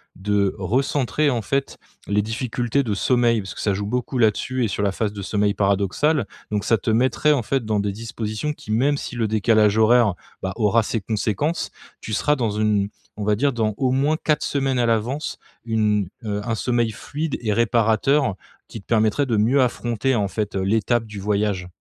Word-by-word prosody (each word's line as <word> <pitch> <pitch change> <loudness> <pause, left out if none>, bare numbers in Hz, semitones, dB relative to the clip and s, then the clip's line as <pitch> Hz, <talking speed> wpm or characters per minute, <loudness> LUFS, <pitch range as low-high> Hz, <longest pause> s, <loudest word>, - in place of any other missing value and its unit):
de 100 0 0
recentrer, 135 +7 +1
en 120 -2 -1
fait, 135 +7 -2 0.3
les 105 0 +2
difficultés 120 +4 -1
de 110 -5 -2
sommeil. 120 +1 +2
Parce 95 - -7
que - - -6
ça 100 - +1
joue 100 +1 -3
beaucoup 125 +3 -2
là-dessus 120 +3 +1
et - - +2
sur 105 0 -2
la 100 - +2
phase 105 +1 -2
de 100 - -6
sommeil 105 +1 0
paradoxal, 100 - +1 0.2
donc 105 -1 -1
ça 115 - +3
te 110 - -1
mettrait, 130 +6 +2
en 145 -4 +2
fait, 130 +2 -1
dans 105 -1 0
des 100 0 -1
dispositions 115 +5 -4
qui 130 - -16
même 135 +7 +2
si 125 - -6
le 115 -2 0
décalage 110 0 +3
horaire, 115 -2 +5 0.3
bah, 95 0 -2
aura 115 0 +3
ses 110 +1 -2
conséquences, 110 - -1 0.3
tu 110 - -6
seras 150 +8 +2
dans 120 -6 -1
une, 105 -1 +1 0.3
on 105 - -4
va 105 0 +3
dire 140 +6 +1
dans 110 -2 0
au 130 -2 +1
moins 140 +4 +2
4 150 -1 +2
semaines 135 -2 0
à 120 - +3
l'avance 115 +7 -1 0.3
une, 105 -4 +1 0.2
heu, 105 -1 -2
un 115 -1 -1
sommeil 120 -1 0
fluide 150 +7 -4
et 110 -3 0
réparateur, 115 +2 +2 0.3
qui 110 - -9
te - - -29
permettrait 110 +5 +2
de 115 -4 0
mieux 120 +7 +3
affronter, 120 +1 0
en 105 -3 +1
fait, 105 -1 -3
heu, 95 - 0
l'étape 110 +3 +1
du 105 -2 -8
voyage. 100 -2 -1
110 Hz, 200 wpm, -22 LUFS, 105-125 Hz, 0.3 s, horaire